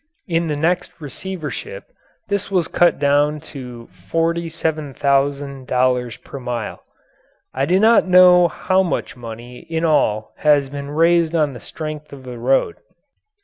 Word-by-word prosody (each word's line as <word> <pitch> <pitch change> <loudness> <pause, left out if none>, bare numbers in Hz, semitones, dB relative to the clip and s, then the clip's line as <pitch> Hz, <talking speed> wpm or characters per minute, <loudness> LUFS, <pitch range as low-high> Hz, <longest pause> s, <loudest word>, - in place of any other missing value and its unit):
In 170 -2 0
the 150 - -1
next 175 +4 0
receivership 190 - -6 0.4
this 200 -1 -2
was 180 -4 +1
cut 175 0 +3
down 145 +1 +2
to 125 -4 -9 0.2
$47,000 140 -6 -1
per 140 - -8
mile. 120 -4 -5 0.7
I 135 +1 0
do 185 +2 +3
not 220 -1 +5
know 180 -1 +7
how 185 +2 +1
much 180 - -2
money 120 +1 -9
in 165 0 -1
all 110 -9 +1
has 145 -3 +3
been 140 0 -6
raised 165 +2 +2
on 150 -4 +1
the 120 - -9
strength 155 -1 -7
of 140 -2 -11
the 125 -2 -8
road. 135 - +1
150 Hz, 135 wpm, -20 LUFS, 135-170 Hz, 0.7 s, know